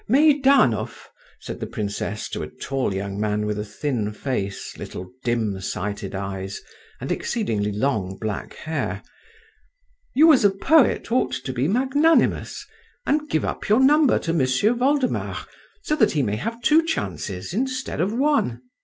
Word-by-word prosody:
"Meidanov," 275 Hz, -, +3 dB, 0.3 s
said -, -, -7 dB
the -, -, -4 dB
princess 105 Hz, 0 st, -4 dB
to -, -, -4 dB
a -, -, -4 dB
tall 135 Hz, -5 st, -2 dB
young 100 Hz, +1 st, -4 dB
man 105 Hz, 0 st, 0 dB
with 105 Hz, 0 st, -2 dB
a -, -, -2 dB
thin 105 Hz, 0 st, -2 dB
face, 105 Hz, -4 st, -4 dB
little 90 Hz, 0 st, -8 dB
dim 110 Hz, -5 st, -1 dB
sighted 100 Hz, +1 st, -4 dB
eyes, 95 Hz, 0 st, -4 dB, 0.4 s
and -, -, -4 dB
exceedingly 110 Hz, -, -1 dB
long 105 Hz, -4 st, -1 dB
black 110 Hz, -1 st, -4 dB
hair, 160 Hz, 0 st, -3 dB, 1.1 s
"you 315 Hz, +4 st, +7 dB
as 260 Hz, -, +3 dB
a 205 Hz, -, +7 dB
poet 240 Hz, +7 st, +3 dB
ought 255 Hz, -, +1 dB
to 130 Hz, -, -4 dB
be 130 Hz, +3 st, 0 dB
magnanimous, 270 Hz, -, +2 dB, 0.4 s
and 300 Hz, +1 st, 0 dB
give 155 Hz, -, 0 dB
up -, -, -4 dB
your 215 Hz, +4 st, +5 dB
number 290 Hz, +1 st, +5 dB
to 165 Hz, -, -2 dB
M'sieu 140 Hz, -, +2 dB
Voldemar 260 Hz, +2 st, 0 dB, 0.4 s
so 305 Hz, -, 0 dB
that 220 Hz, -8 st, +3 dB
he 145 Hz, -3 st, +1 dB
may 105 Hz, -2 st, -1 dB
have 230 Hz, -, -4 dB
two 310 Hz, +6 st, +5 dB
chances 100 Hz, -, -4 dB
instead 255 Hz, -3 st, -2 dB
of 190 Hz, +4 st, +1 dB
one." 235 Hz, -, +1 dB
140 Hz, 155 wpm, -23 LUFS, -, 1.1 s, you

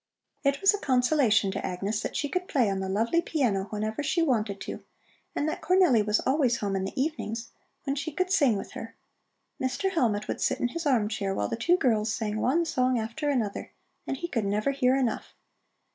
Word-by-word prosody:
It 280 Hz, 0 st, +1 dB
was 390 Hz, +2 st, +6 dB
a 410 Hz, -, -2 dB
consolation 250 Hz, -, +3 dB
to 195 Hz, -, -4 dB
Agnes 195 Hz, +4 st, -2 dB
that -, -, -4 dB
she 290 Hz, -, 0 dB
could 365 Hz, +6 st, -2 dB
play 240 Hz, -8 st, +2 dB
on 195 Hz, -, -2 dB
the 190 Hz, 0 st, -3 dB
lovely 230 Hz, -, +2 dB
piano 240 Hz, -, 0 dB
whenever 215 Hz, +4 st, -3 dB
she 335 Hz, +3 st, +1 dB
wanted 215 Hz, -9 st, 0 dB
to -, -, -6 dB, 0.5 s
and 295 Hz, -, 0 dB
that 310 Hz, -, -3 dB
Cornelli 360 Hz, -, +4 dB
was 210 Hz, 0 st, +2 dB
always 260 Hz, -4 st, +2 dB
home 200 Hz, -2 st, -2 dB
in 190 Hz, 0 st, -1 dB
the 195 Hz, -, -5 dB
evenings, 240 Hz, -6 st, -3 dB, 0.3 s
when 275 Hz, -1 st, -1 dB
she 285 Hz, +3 st, -3 dB
could 370 Hz, +5 st, -1 dB
sing 280 Hz, -, +4 dB
with -, -, -7 dB
her. -, -, -8 dB, 0.7 s
Mr. 260 Hz, +9 st, 0 dB
Hellmut 220 Hz, -, +1 dB
would -, -, -3 dB
sit -, -, +1 dB
in 245 Hz, -, 0 dB
his 330 Hz, +4 st, -3 dB
arm 235 Hz, -7 st, +3 dB
chair 200 Hz, -3 st, -2 dB
while 100 Hz, -, -1 dB
the -, -, -1 dB
two 310 Hz, +11 st, +3 dB
girls 220 Hz, -7 st, +1 dB
sang 215 Hz, -1 st, -2 dB
one 330 Hz, +7 st, +2 dB
song 255 Hz, -5 st, +1 dB
after 230 Hz, +7 st, -2 dB
another, 230 Hz, -8 st, -2 dB, 0.3 s
and 270 Hz, -, -2 dB
he 345 Hz, -, -4 dB
could 230 Hz, -10 st, -1 dB
never 210 Hz, +6 st, +1 dB
hear 260 Hz, -2 st, +2 dB
enough. 250 Hz, -5 st, -2 dB
245 Hz, 210 wpm, -27 LUFS, 210-290 Hz, 0.7 s, was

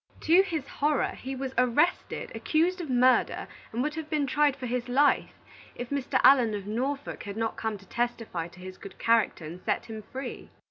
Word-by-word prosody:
To 340 Hz, +4 st, +6 dB
his 320 Hz, -8 st, -3 dB
horror, 295 Hz, -1 st, +1 dB
he 265 Hz, +1 st, -6 dB
was 265 Hz, 0 st, -4 dB
arrested, 255 Hz, +8 st, +1 dB
accused 350 Hz, +4 st, +1 dB
of 320 Hz, -, -6 dB
murder, 255 Hz, 0 st, +3 dB, 0.2 s
and 235 Hz, +3 st, -1 dB
would 300 Hz, +1 st, -1 dB
have 315 Hz, -1 st, -6 dB
been 300 Hz, -2 st, +1 dB
tried 290 Hz, +1 st, +2 dB
for 265 Hz, -2 st, -6 dB
his 245 Hz, 0 st, -2 dB
life, 285 Hz, +4 st, +3 dB, 0.5 s
if 245 Hz, +1 st, -6 dB
Mr. 275 Hz, -2 st, 0 dB
Allen 245 Hz, -6 st, +6 dB
of 200 Hz, -2 st, -5 dB
Norfolk 265 Hz, +7 st, -3 dB
had 205 Hz, 0 st, -6 dB
not 225 Hz, 0 st, -1 dB
come 220 Hz, -2 st, -3 dB
to 195 Hz, -, -17 dB
testify 230 Hz, -8 st, -2 dB
to 175 Hz, +1 st, -16 dB
his 185 Hz, 0 st, -9 dB
good 195 Hz, -, -10 dB
character, 230 Hz, -7 st, +2 dB
and 170 Hz, +4 st, -8 dB
set -, -, -1 dB
him 220 Hz, -1 st, -7 dB
free. 260 Hz, +4 st, -7 dB
255 Hz, 195 wpm, -28 LUFS, 225-285 Hz, 0.5 s, To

